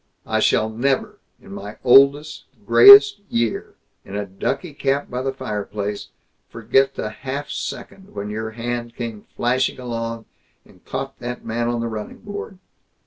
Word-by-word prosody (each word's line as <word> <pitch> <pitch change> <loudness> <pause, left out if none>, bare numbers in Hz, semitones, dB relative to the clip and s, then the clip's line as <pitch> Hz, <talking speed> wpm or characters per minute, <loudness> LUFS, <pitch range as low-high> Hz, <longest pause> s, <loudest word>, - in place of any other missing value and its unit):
I - - 0
shall 110 - +2
never, 130 +5 -1 0.2
in - - -15
my 105 +2 -8
oldest 140 +4 +4 0.2
grayest 405 0 +9
year, 115 -1 -2 0.3
in 100 - -9
a 105 0 -2
ducky 135 - -4
cap 140 0 -1
by 125 +1 -3
the 135 +1 -1
fireplace, 105 -4 -5 0.4
forget 130 +4 +1
the 105 - -4
half 135 +5 -6
second 190 - -7
when 100 +1 -5
your 110 +1 -4
hand 120 +1 -5
came 115 -4 -6
flashing 130 +2 0
along, 115 -2 -5 0.4
and 90 - -22
caught 135 +1 -5
that 125 0 -6
man 115 +1 -2
on 120 -1 -1
the 115 - -2
running 110 -2 -6
board. 205 -1 -7
120 Hz, 150 wpm, -21 LUFS, 110-135 Hz, 0.4 s, grayest